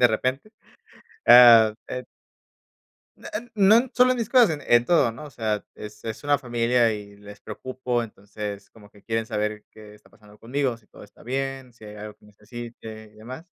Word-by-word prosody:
de 125 Hz, -, +7 dB
repente, 130 Hz, -, -2 dB, 0.8 s
ah, 115 Hz, -3 st, +8 dB
eh. 125 Hz, 0 st, -5 dB, 1.1 s
No, -, -, -11 dB
eh, 235 Hz, +3 st, -7 dB
no 220 Hz, +5 st, +4 dB
solo 255 Hz, 0 st, +4 dB
en -, -, -3 dB
mis 230 Hz, -1 st, -3 dB
cosas, 235 Hz, -, +4 dB
en 120 Hz, 0 st, +4 dB
todo, 135 Hz, -9 st, +3 dB
¿no?, 150 Hz, +7 st, -10 dB
o 150 Hz, -, -11 dB
sea, 110 Hz, -5 st, -3 dB
es 105 Hz, 0 st, -11 dB
es 115 Hz, +5 st, -6 dB
una 145 Hz, 0 st, +2 dB
familia 120 Hz, -1 st, +1 dB
y 100 Hz, -1 st, -10 dB
les 105 Hz, 0 st, -14 dB
preocupo. 125 Hz, -2 st, -4 dB
Entonces, 105 Hz, -2 st, -8 dB
como 105 Hz, -2 st, -18 dB
que 105 Hz, -, -21 dB
quieren 115 Hz, -1 st, -2 dB
saber 105 Hz, 0 st, -3 dB
qué 105 Hz, -1 st, -15 dB
está 105 Hz, -, -22 dB
pasando 105 Hz, -1 st, -20 dB
conmigo, 125 Hz, +1 st, -2 dB
si 105 Hz, -, -29 dB
todo -, -, -15 dB
está 105 Hz, -, -20 dB
bien, 135 Hz, 0 st, -4 dB
si 110 Hz, -, -17 dB
hay 105 Hz, 0 st, -10 dB
algo 105 Hz, 0 st, -9 dB
que -, -, -26 dB
necesite 110 Hz, 0 st, -11 dB
y -, -, -24 dB
demás. 125 Hz, +8 st, -10 dB
115 Hz, 190 wpm, -24 LUFS, 105-130 Hz, 1.1 s, ah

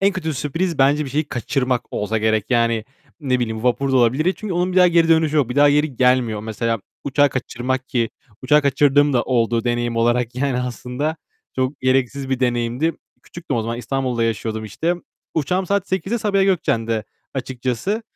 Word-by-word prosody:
en 195 Hz, +1 st, +3 dB
kötü 160 Hz, -5 st, -3 dB
sürpriz 165 Hz, +5 st, -2 dB
bence 145 Hz, +3 st, +3 dB
bir 135 Hz, -, -7 dB
şeyi 150 Hz, +3 st, 0 dB
kaçırmak 125 Hz, 0 st, -1 dB
olsa 110 Hz, +2 st, -1 dB
gerek. 110 Hz, -1 st, +1 dB
Yani, 115 Hz, -2 st, +2 dB, 0.4 s
ne 130 Hz, -3 st, 0 dB
bileyim, 110 Hz, -2 st, -3 dB
vapur 135 Hz, +2 st, +1 dB
da -, -, +4 dB
olabilir. 125 Hz, +6 st, +3 dB
Ni 185 Hz, -, +3 dB
çünkü 210 Hz, -5 st, -5 dB
onun 180 Hz, +1 st, 0 dB
bir 185 Hz, -, -4 dB
daha 180 Hz, -1 st, +7 dB
geri 170 Hz, -1 st, +3 dB
dönüşü 160 Hz, -2 st, +3 dB
yok. 140 Hz, -5 st, +2 dB
Bir 125 Hz, -, -5 dB
daha 145 Hz, 0 st, +6 dB
geri 145 Hz, -3 st, +1 dB
gelmiyor. 125 Hz, -4 st, +2 dB
Mesela, 115 Hz, 0 st, -2 dB, 0.2 s
uçağı 145 Hz, +1 st, +3 dB
kaçırmak 130 Hz, 0 st, -3 dB
ki; 115 Hz, -3 st, 0 dB, 0.3 s
uçağı 150 Hz, +3 st, +4 dB
kaçırdığım 145 Hz, +1 st, +3 dB
da 120 Hz, -, +2 dB
oldu, 115 Hz, -2 st, +1 dB
deneyim 120 Hz, -1 st, -1 dB
olarak 120 Hz, +1 st, +1 dB
yani 130 Hz, -1 st, 0 dB
aslında. 125 Hz, +5 st, -3 dB, 0.4 s
Çok 130 Hz, +2 st, -1 dB
gereksiz 130 Hz, +1 st, 0 dB
bir 130 Hz, -1 st, 0 dB
deneyimdi. 120 Hz, +5 st, 0 dB, 0.3 s
Küçüktüm 165 Hz, -7 st, -5 dB
o 115 Hz, -, 0 dB
zaman, 115 Hz, +1 st, -3 dB
İstanbul'da 125 Hz, -1 st, -1 dB
yaşıyordum 110 Hz, 0 st, -2 dB
işte. 155 Hz, -, -1 dB, 0.4 s
Uçağım 180 Hz, +5 st, 0 dB
saat 200 Hz, 0 st, 0 dB
20.00'de 190 Hz, +5 st, -1 dB
Sabiha 200 Hz, -2 st, +1 dB
Gökçen'de 115 Hz, -, 0 dB, 0.3 s
açıkçası. 130 Hz, -, -2 dB
130 Hz, 180 wpm, -20 LUFS, 120-150 Hz, 0.4 s, daha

